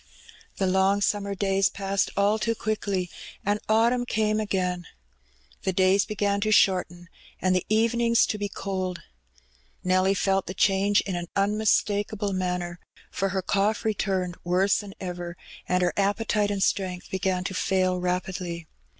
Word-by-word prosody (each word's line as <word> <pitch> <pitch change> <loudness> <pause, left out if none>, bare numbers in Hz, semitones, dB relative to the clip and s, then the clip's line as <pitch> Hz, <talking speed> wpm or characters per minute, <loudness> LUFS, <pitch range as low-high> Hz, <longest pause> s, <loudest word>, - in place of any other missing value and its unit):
The 195 - +1
long 190 +2 +3
summer 200 -1 0
days 195 0 +2
passed 195 0 -1
all 205 +2 +3
too 230 +1 0
quickly, 205 -4 -2 0.4
and 205 +1 +1
autumn 235 +3 +3
came 215 -1 +1
again. 180 -4 -1 0.7
The 190 - -1
days 190 +2 +3
began 200 -1 -1
to 215 - +1
shorten, 180 -4 +2 0.3
and 185 0 +2
the 185 - -1
evenings 230 +2 +3
to 210 - -3
be 205 0 -2
cold. 185 -2 -4 0.8
Nelly 185 +1 +3
felt 195 0 +1
the 185 - -5
change 200 +2 +3
in 190 - -4
an 175 0 -4
unmistakable 205 0 +1
manner, 180 -2 -2 0.3
for 195 - -1
her 190 -1 -2
cough 205 +4 0
returned 190 -4 -1
worse 185 +3 +2
than 200 -2 -9
ever, 175 -2 -5 0.3
and 180 0 +2
her 175 -3 +1
appetite 205 +1 +1
and 200 -1 0
strength 185 -3 -1
began 185 -1 0
to 190 - -4
fail 185 +1 +1
rapidly. 180 -2 -3
195 Hz, 150 wpm, -26 LUFS, 185-205 Hz, 0.8 s, long